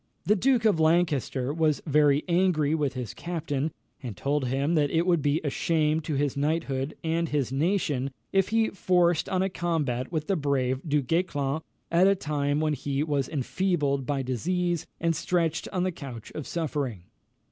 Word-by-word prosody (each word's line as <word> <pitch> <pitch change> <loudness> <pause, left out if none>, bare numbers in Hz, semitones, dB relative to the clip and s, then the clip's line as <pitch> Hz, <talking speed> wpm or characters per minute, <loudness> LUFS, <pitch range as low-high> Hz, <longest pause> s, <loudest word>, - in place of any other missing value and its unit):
The 210 - +4
Duke 245 +2 +2
of 205 -7 +4
Lancaster 155 -5 +1
was 155 -2 +2
very 150 -1 +3
angry 170 -4 +2
with 145 -4 0
his 125 -4 -4
captain, 160 -4 -3 0.3
and 120 -8 -6
told 140 +3 0
him 135 +5 0
that 150 -3 +2
it 165 +3 +1
would 175 -4 +3
be 145 +2 +2
a 145 - -1
shame 155 0 +1
to 155 -1 -3
his 140 -1 0
knighthood 140 -2 -1
and 165 0 0
his 140 -4 0
nation 145 -3 0 0.2
if 195 -1 +3
he 225 0 +2
forced 175 -3 +2
on 185 -1 +1
a - - +1
combat 150 -9 -1
with 155 -3 -2
the 195 - +1
brave 135 -4 0
Du 150 -1 +2
Guesclin 150 -1 0 0.3
at 175 +3 +5
a 195 - +4
time 145 -4 -1
when 155 -1 +1
he 140 +1 -1
was 145 -4 -1
enfeebled 145 -2 0
by 140 -2 0
disease 175 +7 -1
and 165 0 +1
stretched 165 -1 0
on 180 -1 0
the 185 - 0
couch 135 -9 -9
of 155 - -6
suffering. 140 - -3
155 Hz, 180 wpm, -27 LUFS, 140-170 Hz, 0.3 s, at